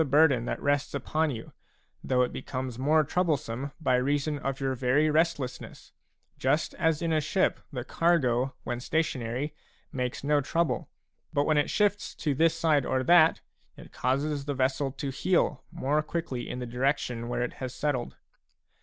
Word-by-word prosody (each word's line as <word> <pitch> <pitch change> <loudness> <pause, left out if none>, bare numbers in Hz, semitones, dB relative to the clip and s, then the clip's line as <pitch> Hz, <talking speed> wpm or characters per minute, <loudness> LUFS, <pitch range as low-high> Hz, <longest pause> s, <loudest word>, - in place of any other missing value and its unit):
burden 140 -4 +4
that - - -3
rests 145 0 0
upon 155 +3 0
you, 115 -5 -7 0.5
though 125 -1 +2
it 125 - -2
becomes 130 -2 -5
more 155 +4 +4
troublesome 145 -5 -1
by 135 -6 +1
reason 145 +3 0
of 135 -1 -3
your 135 -1 0
very 135 +5 +2
restlessness, 155 -5 -1 0.5
just 140 +4 +1
as 160 -1 +1
in 165 -1 +1
a 155 - +2
ship 170 +6 +1
the 125 -4 -4
cargo 135 -7 +1
when 120 -1 -3
stationary 130 -1 -1 0.4
makes 125 -1 -3
no 145 0 +3
trouble, 165 +4 -1 0.4
but 145 -1 +1
when 155 - +2
it 145 - 0
shifts 205 -1 +1
to 150 - -1
this 165 +4 +2
side 155 -4 +3
or 130 0 0
that, 165 +2 +5 0.4
it - - -13
causes 140 +3 -1
the 145 -1 -2
vessel 135 +1 0
to 135 +1 -4
heel 180 +7 +1
more 150 -3 0
quickly 150 -6 -4
in - - -4
the 125 - -4
direc 130 +4 +1
tion 120 -1 -5
where 120 - -1
it 125 - -3
has 130 -1 -3
settled. 130 -3 -2
140 Hz, 170 wpm, -28 LUFS, 130-155 Hz, 0.5 s, that